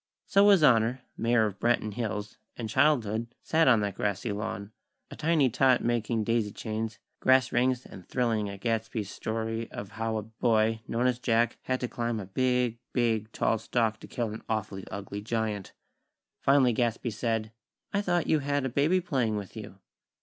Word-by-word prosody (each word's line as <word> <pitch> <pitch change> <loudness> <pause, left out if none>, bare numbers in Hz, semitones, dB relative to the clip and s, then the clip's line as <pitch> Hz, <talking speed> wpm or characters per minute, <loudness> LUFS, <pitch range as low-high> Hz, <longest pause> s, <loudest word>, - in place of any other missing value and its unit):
So 200 +1 +5
His 195 -6 +6
Honor, 125 -1 +4
Mayor 115 -1 +2
of 100 -1 -4
Branton 115 -2 +1
Hills, 105 -2 -4 0.2
and 115 - -4
Childhood 115 -4 +2 0.2
sat 160 -1 +3
on 120 -5 +6
that 100 -1 -1
grassy 105 +3 -2
lawn; 100 -1 -4 0.4
a - - -7
tiny 155 -3 +3
tot 130 +1 +3
making 115 -1 0
daisy 115 -1 0
chains, 110 0 -4 0.2
grass 130 -1 +4
rings, 125 +1 +1
and 95 - -12
thrilling 115 -5 0
at 100 0 -8
Gadsby's 110 -3 -2
story 115 +1 -3
of 100 - -7
how 115 0 -2
a 105 - -3
boy, 110 0 +1
known 120 +2 0
as 125 -1 +1
Jack, 115 -1 +1
had 130 0 0
to 125 - -1
climb 120 -2 -2
a 100 - -5
big, 125 +3 0
big 110 -3 +1
tall 115 - +1
stalk 110 -1 0
to - - -11
kill 115 -3 -3
an 110 - -7
awfully 105 -3 -3
ugly 100 0 -6
giant. 110 -2 -2 0.7
Finally 135 -3 +4
Gadsby 120 0 0
said: 110 0 -2 0.4
"I 200 - +2
thought 175 -4 +1
you 155 - +3
had 145 -1 -1
a - - 0
baby 150 +9 +2
playing 130 -10 0
with 100 -2 -6
you." 105 -3 -8
115 Hz, 180 wpm, -28 LUFS, 110-125 Hz, 0.7 s, His